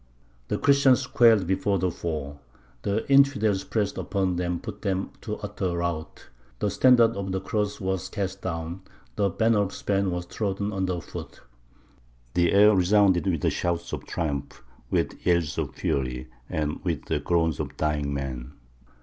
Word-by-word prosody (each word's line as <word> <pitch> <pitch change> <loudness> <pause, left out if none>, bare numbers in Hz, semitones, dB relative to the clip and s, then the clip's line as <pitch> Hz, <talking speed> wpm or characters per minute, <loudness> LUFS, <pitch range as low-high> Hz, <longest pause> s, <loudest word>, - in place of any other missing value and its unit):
The - - -1
Christians 140 -2 +4
quailed 115 -5 +5
before 95 +2 +1
the 90 0 0
foe. 75 -4 -5 0.4
The 100 +2 -1
infidels 135 -8 +4
pressed 105 -3 -1
upon 95 -3 -1
them 90 0 -1
and 85 - -5
put 110 -3 -7
them 95 -2 -1
to - - -4
utter 90 -2 -3
rout; 85 -2 -4 0.3
the - - -1
standard 120 -3 +5
of 100 -1 -3
the 95 - -1
Cross 105 +1 -2
was 95 -2 -2
cast 95 -2 -4
down, 85 +1 -4 0.3
the 100 -2 +2
banner 110 +3 +2
of 100 -1 0
Spain 100 -1 0
was 90 -1 -3
trodden 100 +2 -2
under 95 -2 -1
foot; - - -9 0.9
the 85 -1 +3
air 105 +1 +6
resounded 95 0 +4
with 85 -6 +1
shouts 85 0 -2
of - - -5
triumph, 75 -5 -3 0.3
with - - -1
yells 85 -3 +1
of - - -3
fury, 65 -2 -2 0.2
and 75 -1 -2
with 85 -7 -2
the - - -1
groans 80 -3 +1
of - - -5
dying 75 -2 0
men. 65 -2 -4
95 Hz, 160 wpm, -26 LUFS, 85-100 Hz, 0.9 s, air